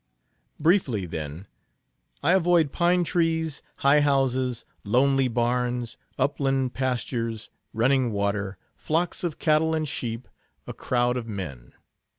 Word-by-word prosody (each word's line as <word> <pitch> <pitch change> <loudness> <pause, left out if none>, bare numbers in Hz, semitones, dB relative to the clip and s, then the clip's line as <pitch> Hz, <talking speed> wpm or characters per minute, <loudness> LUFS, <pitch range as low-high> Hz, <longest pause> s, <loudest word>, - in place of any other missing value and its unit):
"Briefly, 145 - +2
then. 80 +1 -6 0.8
I 155 - +4
avoid 175 -5 +3
pine 175 0 +2
trees, 160 -3 0 0.2
high 145 +2 +6
houses, 130 -4 +1 0.2
lonely 135 +5 +3
barns, 120 0 -1 0.2
upland 135 -2 0
pastures, 115 -3 -2 0.2
running 125 +2 +2
water, 100 -1 -1 0.2
flocks 165 +3 -1
of 170 -4 -2
cattle 160 +1 +2
and 155 -1 -1
sheep, 115 -3 -4 0.4
a - - -6
crowd 125 0 0
of 120 -2 -5
men. 75 - -7
130 Hz, 115 wpm, -25 LUFS, 115-155 Hz, 0.8 s, high